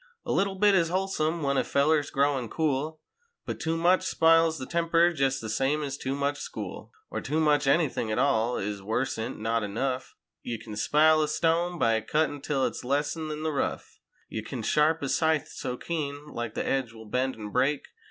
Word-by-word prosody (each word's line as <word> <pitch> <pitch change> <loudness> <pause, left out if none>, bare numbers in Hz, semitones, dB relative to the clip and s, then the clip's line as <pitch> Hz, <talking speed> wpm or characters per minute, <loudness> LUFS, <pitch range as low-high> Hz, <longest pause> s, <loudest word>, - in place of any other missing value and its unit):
A - - -2
little 195 0 +1
bit 205 +1 +4
is 170 -4 +3
wholesome 170 -3 -1
when 140 -1 +1
a - - +3
feller's 145 +1 +2
growin' 140 -4 +1
cool 155 +2 -1 0.4
But - - -4
too 165 0 -1
much 180 +3 +3
spiles 165 0 +4
the 130 - -5
temper 170 +2 +2
jest 135 -3 0
the 110 - -5
same 135 +7 0
ez 140 -2 -3
too 135 -1 -3
much 140 +1 -1
school. - - -7 0.2
Or - - -3
too 150 +4 -1
much 150 -3 +3
anything 140 -6 +2
at 110 - -1
all, 125 -3 +2
is 100 0 -3
worse'n 115 +2 -2
not 115 +1 +1
enough: 125 +6 -3 0.3
Ye 120 -1 -4
kin 105 -1 -9
spile 155 +7 +4
a 155 - +1
stone 170 +3 +1
by 115 -6 +2
cuttin' 150 +2 0
'till 140 -3 0
it's - - -4
less'n 145 +4 -1
in 155 0 -4
the 160 - 0
rough; 140 - -3 0.3
Ye 110 - -4
kin 115 +1 -6
sharp 155 +5 +2
a 140 - -1
scythe 155 0 +1
so 125 - -5
keen—like 145 -7 -4
that - - -1
the - - -5
edge 130 -4 -1
will 110 -1 -11
bend 130 +5 -1
an' 105 -1 -7
break. 135 +4 +1
145 Hz, 200 wpm, -27 LUFS, 125-160 Hz, 0.4 s, bit